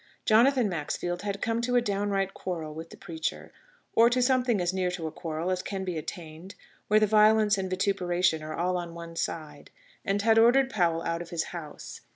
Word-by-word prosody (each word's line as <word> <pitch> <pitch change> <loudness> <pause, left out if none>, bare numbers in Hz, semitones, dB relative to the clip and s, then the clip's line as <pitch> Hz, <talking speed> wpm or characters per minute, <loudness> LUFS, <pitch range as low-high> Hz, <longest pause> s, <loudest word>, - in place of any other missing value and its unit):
Jonathan 240 +2 +4
Maxfield 175 +1 -3
had 200 -1 -4
come 230 -1 0
to 245 +1 0
a - - +6
downright 200 -2 -1
quarrel 160 -4 -5
with 165 +2 -8
the - - -13
preacher 165 -5 -5 0.4
or 230 +1 +6
to 250 +1 +1
something 250 -3 +2
as 175 0 0
near 185 -1 0
to 180 -2 -5
a 160 - -3
quarrel 165 +3 -4
as 185 0 -1
can 195 -1 -4
be 180 -2 -3
attained, 160 +3 -8 0.3
where 215 +1 +5
the 215 - +4
violence 215 0 +4
and 190 -1 -3
vituperation 180 -3 +1
are 155 0 -6
all 180 +1 0
on 170 -1 -6
one 170 0 -9
side 150 -3 -5 0.3
and 200 +1 0
had 225 0 +5
ordered 260 +3 +5
Powell 170 -6 +1
out 170 0 -2
of 170 - -8
his 165 -2 -1
house. 160 -4 -8
185 Hz, 200 wpm, -28 LUFS, 165-215 Hz, 0.4 s, a